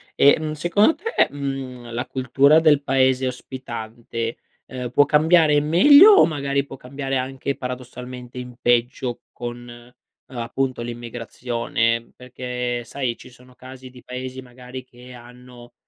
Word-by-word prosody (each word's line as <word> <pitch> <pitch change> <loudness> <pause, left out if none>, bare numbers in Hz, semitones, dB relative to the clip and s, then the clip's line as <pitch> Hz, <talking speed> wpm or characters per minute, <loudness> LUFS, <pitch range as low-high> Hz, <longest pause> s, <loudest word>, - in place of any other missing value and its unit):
E, 140 - +6
mhmm, 155 -1 -3
secondo 175 - +2
te, 455 +2 +1
mhmm, 135 -4 -6
la 125 +2 -3
cultura 135 +4 +3
del 150 -3 +4
paese 130 -1 +2
ospitante, 115 -2 -6 0.3
ehm, 125 -1 -6
può 145 +3 +5
cambiare 155 +1 +4
in 145 0 +2
meglio 285 - +8
o 400 - +7
magari 140 -2 -1
può 135 - -10
cambiare 135 +1 -5
anche 135 +1 -3
paradossalmente 125 -1 -8
in 125 -1 -8
peggio 120 0 0
con, 120 0 -7
ehm, 120 +1 -16
appunto, 125 +1 -2
l'immigrazione, 115 0 -3
perché 125 -1 -4
sai 125 0 -3
ci - - -14
sono 125 0 -19
casi 130 0 -12
di 125 0 -16
paesi 130 +1 -7
magari 125 0 -10
che 125 0 -15
hanno 125 0 -14
125 Hz, 140 wpm, -22 LUFS, 120-140 Hz, 0.3 s, meglio